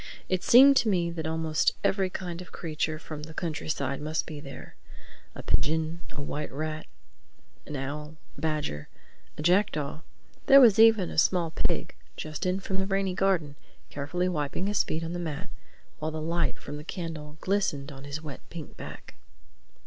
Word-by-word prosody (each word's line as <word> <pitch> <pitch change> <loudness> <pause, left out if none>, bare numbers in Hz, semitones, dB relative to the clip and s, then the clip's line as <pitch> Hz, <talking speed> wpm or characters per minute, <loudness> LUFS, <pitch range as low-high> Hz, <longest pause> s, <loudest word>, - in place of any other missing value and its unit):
It 185 -1 +1
seemed 275 +3 +8
to 230 - +3
me 175 -4 +2
that 160 -2 -3
almost 160 -1 +1
every 195 -1 +2
kind 180 -2 -5
of 180 - -11
creature 155 -1 -2
from 155 -1 -7
the 160 +1 -9
countryside 145 -4 -2
must 155 +1 -1
be 150 -2 -7
there: 140 -2 -9 0.6
a - - -7
pigeon, 160 +2 +1
a - - -10
white 150 +1 -4
rat, 155 +2 -4 0.8
an 150 - -5
owl, 150 +3 -4 0.2
a - - -11
badger, 150 - -2 0.5
a 150 - -4
jackdaw—there 175 - +2
was 230 -5 +7
even 220 -5 +6
a - - +2
small 170 -1 +3
pig, - - -1 0.2
just 155 +3 -3
in 185 +1 +1
from 190 0 -3
the 190 0 0
rainy 195 -1 +1
garden, 180 -6 +1 0.4
carefully 145 +6 -1
wiping 155 0 -1
his 205 0 +2
feet 160 +1 -2
on 165 +1 -3
the 175 - -3
mat 165 +1 -4 0.5
while 155 - -1
the 155 0 -4
light 170 +2 0
from 145 +1 -7
the 150 - -8
candle 155 -3 -6
glistened 160 -8 0
on 135 -1 -10
his 145 +2 -5
wet 145 -4 -7
pink 165 -3 -8
back. - - -9
160 Hz, 170 wpm, -28 LUFS, 150-185 Hz, 0.8 s, seemed